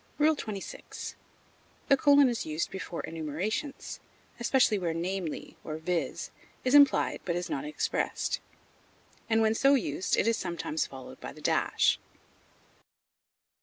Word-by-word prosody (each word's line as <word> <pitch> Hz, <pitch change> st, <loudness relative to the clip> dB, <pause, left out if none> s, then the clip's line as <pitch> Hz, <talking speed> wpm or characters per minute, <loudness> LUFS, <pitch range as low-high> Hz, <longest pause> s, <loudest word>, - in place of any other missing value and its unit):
XXVI. 285 Hz, -10 st, -2 dB, 0.7 s
The 275 Hz, -, +6 dB
colon 285 Hz, 0 st, +6 dB
is 240 Hz, -3 st, -1 dB
used 155 Hz, +1 st, -2 dB
before 185 Hz, -3 st, -5 dB
enumerations, 165 Hz, -, -4 dB, 0.4 s
especially 235 Hz, -3 st, +3 dB
where 170 Hz, -3 st, -1 dB
"namely," 175 Hz, -1 st, -3 dB
or 155 Hz, 0 st, -4 dB
"viz.," 170 Hz, +1 st, -2 dB, 0.3 s
is 255 Hz, -, +1 dB
implied 285 Hz, -1 st, +5 dB
but 170 Hz, -, -1 dB
is 175 Hz, -, -3 dB
not 290 Hz, -1 st, -2 dB
expressed; 300 Hz, -, -1 dB, 0.9 s
and 225 Hz, 0 st, +4 dB
when 220 Hz, 0 st, +3 dB
so 275 Hz, +5 st, +5 dB
used 215 Hz, -7 st, 0 dB
it -, -, +2 dB
is 230 Hz, 0 st, +3 dB
sometimes 170 Hz, -3 st, -2 dB
followed 130 Hz, -1 st, -10 dB
by -, -, -6 dB
the -, -, -13 dB
dash. -, -, +2 dB
210 Hz, 130 wpm, -29 LUFS, 170-270 Hz, 0.9 s, The